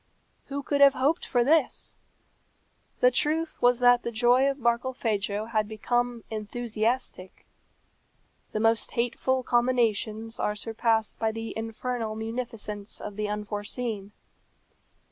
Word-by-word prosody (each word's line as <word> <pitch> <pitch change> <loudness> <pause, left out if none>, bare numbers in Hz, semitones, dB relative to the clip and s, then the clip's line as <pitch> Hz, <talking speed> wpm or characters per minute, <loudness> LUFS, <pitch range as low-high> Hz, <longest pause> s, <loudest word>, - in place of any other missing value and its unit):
Who 280 0 -4
could 285 0 0
have 280 -1 +8
hoped 290 +6 +1
for 245 -1 +2
this? 300 +2 +1 1.1
The 250 - +6
truth 310 +6 0
was 245 0 +5
that 245 0 +6
the 235 - -4
joy 245 +4 +4
of 275 - -2
Barkilphedro 230 -4 -1
had 215 -2 +1
become 240 +2 -1
enthusiastic. 220 -2 -3 1.1
The 215 - -2
most 225 +1 +2
hateful 250 +2 0
combinations 230 -3 +1
are 210 - 0
surpassed 225 0 0
by 220 0 +1
the 225 0 -6
infernal 225 0 -3
munificence 220 -2 -5
of 210 - -7
the 210 0 -2
unforeseen. 210 0 -4
230 Hz, 120 wpm, -27 LUFS, 215-250 Hz, 1.1 s, have